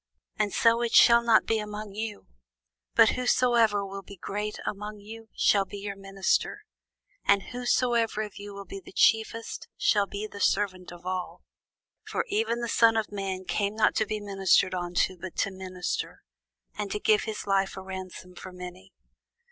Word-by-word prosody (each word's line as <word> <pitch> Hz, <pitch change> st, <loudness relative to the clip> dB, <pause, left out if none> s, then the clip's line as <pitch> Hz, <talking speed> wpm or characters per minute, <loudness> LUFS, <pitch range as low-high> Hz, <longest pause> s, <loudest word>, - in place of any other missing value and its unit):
But 210 Hz, -1 st, 0 dB
so 230 Hz, +1 st, +4 dB
shall 235 Hz, 0 st, +7 dB
it -, -, -12 dB
not 225 Hz, -2 st, +5 dB
be 225 Hz, -1 st, +1 dB
among 210 Hz, -1 st, -6 dB
you: 215 Hz, 0 st, -5 dB, 0.7 s
but -, -, +7 dB
whosoever 235 Hz, -5 st, +2 dB
will 195 Hz, 0 st, -7 dB
be 200 Hz, +1 st, -13 dB
great 210 Hz, +4 st, -4 dB
among 210 Hz, +1 st, -5 dB
you, 220 Hz, +2 st, -11 dB
shall 200 Hz, -1 st, +4 dB
be 205 Hz, -, -9 dB
your 200 Hz, 0 st, -5 dB
minister: 195 Hz, -1 st, -1 dB, 0.6 s
and 200 Hz, -1 st, +3 dB
whosoever 240 Hz, -3 st, +1 dB
of 210 Hz, -2 st, -9 dB
you 205 Hz, 0 st, -8 dB
will 200 Hz, 0 st, -8 dB
be 195 Hz, +1 st, -8 dB
the -, -, -12 dB
chiefest, 225 Hz, +2 st, +1 dB
shall 205 Hz, -2 st, +3 dB
be 205 Hz, +2 st, -5 dB
servant 185 Hz, -3 st, 0 dB
of 175 Hz, 0 st, -12 dB
all. 185 Hz, -1 st, -4 dB, 0.6 s
For 460 Hz, -, -2 dB
even 405 Hz, -, 0 dB
the 235 Hz, -, -2 dB
Son 225 Hz, 0 st, +4 dB
of 220 Hz, -1 st, -1 dB
man 190 Hz, -2 st, -4 dB
came 205 Hz, +2 st, -1 dB
not 220 Hz, -, +3 dB
to 220 Hz, -, +1 dB
be 215 Hz, 0 st, -2 dB
ministered 195 Hz, -2 st, +2 dB
unto, 180 Hz, +1 st, 0 dB
but 185 Hz, 0 st, -7 dB
to 195 Hz, -, 0 dB
minister, 185 Hz, -1 st, -5 dB, 0.5 s
and 210 Hz, -1 st, -3 dB
to 210 Hz, -, -2 dB
give 215 Hz, 0 st, +3 dB
his 220 Hz, -2 st, -5 dB
life 195 Hz, -1 st, +1 dB
a 190 Hz, -, -6 dB
ransom 185 Hz, -1 st, -8 dB
for 185 Hz, +1 st, -10 dB
many. 180 Hz, +1 st, -10 dB
205 Hz, 170 wpm, -27 LUFS, 190-220 Hz, 0.7 s, shall